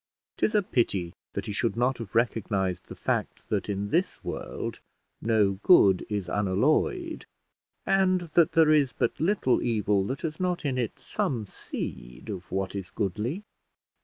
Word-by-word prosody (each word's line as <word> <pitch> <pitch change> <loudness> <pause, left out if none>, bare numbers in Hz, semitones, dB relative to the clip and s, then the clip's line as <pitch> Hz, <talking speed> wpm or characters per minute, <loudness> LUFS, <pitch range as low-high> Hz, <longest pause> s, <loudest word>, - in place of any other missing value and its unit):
'Tis 215 - +1
a 210 - +4
pity 95 - 0 0.2
that - - -3
he - - -4
should 105 +1 -1
not 125 +1 +1
have 115 -3 -8
recognised 100 -6 0
the - - -8
fact, - - -2
that - - -1
in 100 0 -2
this 175 - 0
world - - -5 0.4
no 105 -4 +2
good 100 - +6
is 100 -4 -2
unalloyed, 135 - +1 0.6
and 185 -1 +3
that 170 -2 +4
there 160 -1 +5
is 145 -5 +3
but - - -1
little 165 -6 +2
evil 105 -4 +1
that 130 +7 -4
has 155 -2 -4
not 180 -3 -1
in 130 -3 0
it 120 -4 -2
some 115 -5 -2
seed 60 - -7
of 95 -3 -6
what 95 0 -2
is 95 -2 -5
goodly. 110 - -2
115 Hz, 160 wpm, -27 LUFS, 100-155 Hz, 0.6 s, good